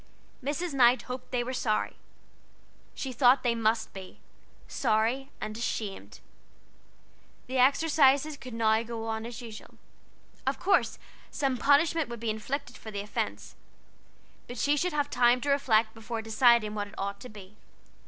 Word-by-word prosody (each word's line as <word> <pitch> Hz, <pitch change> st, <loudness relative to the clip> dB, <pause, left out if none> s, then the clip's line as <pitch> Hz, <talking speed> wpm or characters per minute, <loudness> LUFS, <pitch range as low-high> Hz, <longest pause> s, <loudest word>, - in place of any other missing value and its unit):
Mrs. 300 Hz, +4 st, -2 dB
Knight 250 Hz, -2 st, +5 dB
hoped 255 Hz, 0 st, -7 dB
they 245 Hz, -1 st, 0 dB
were 255 Hz, +2 st, -4 dB
sorry; 215 Hz, -4 st, -1 dB, 1.0 s
she 265 Hz, -2 st, -4 dB
thought 250 Hz, +1 st, +4 dB
they 240 Hz, -2 st, +2 dB
must 225 Hz, 0 st, 0 dB
be 190 Hz, -1 st, -10 dB, 0.5 s
sorry 235 Hz, +3 st, 0 dB
and 215 Hz, -, -5 dB
ashamed. 215 Hz, -3 st, -5 dB, 1.2 s
The 260 Hz, 0 st, -2 dB
exercises 285 Hz, +1 st, +4 dB
could 255 Hz, -4 st, -9 dB
now 220 Hz, -1 st, +3 dB
go 230 Hz, -1 st, -6 dB
on 220 Hz, 0 st, -3 dB
as 240 Hz, +1 st, -8 dB
usual. 220 Hz, -2 st, -10 dB, 0.7 s
Of -, -, +1 dB
course 390 Hz, +3 st, +2 dB, 0.3 s
some 270 Hz, -2 st, -1 dB
punishment 295 Hz, +4 st, +3 dB
would 235 Hz, -1 st, -6 dB
be 225 Hz, -1 st, -1 dB
inflicted 270 Hz, +7 st, -5 dB
for 220 Hz, -, -9 dB
the 200 Hz, -2 st, -4 dB
offense, 210 Hz, -, -4 dB, 0.9 s
but 245 Hz, -, -8 dB
she 285 Hz, +6 st, +2 dB
should 360 Hz, +5 st, 0 dB
have 290 Hz, -1 st, -1 dB
to 250 Hz, +2 st, +3 dB
reflect 225 Hz, -6 st, +2 dB
before 225 Hz, 0 st, -5 dB
deciding 225 Hz, -1 st, +4 dB
what 205 Hz, -1 st, -3 dB
it 205 Hz, -, -15 dB
ought 200 Hz, 0 st, -4 dB
to 250 Hz, -, -10 dB
be. 205 Hz, 0 st, -13 dB
240 Hz, 150 wpm, -28 LUFS, 220-270 Hz, 1.2 s, Knight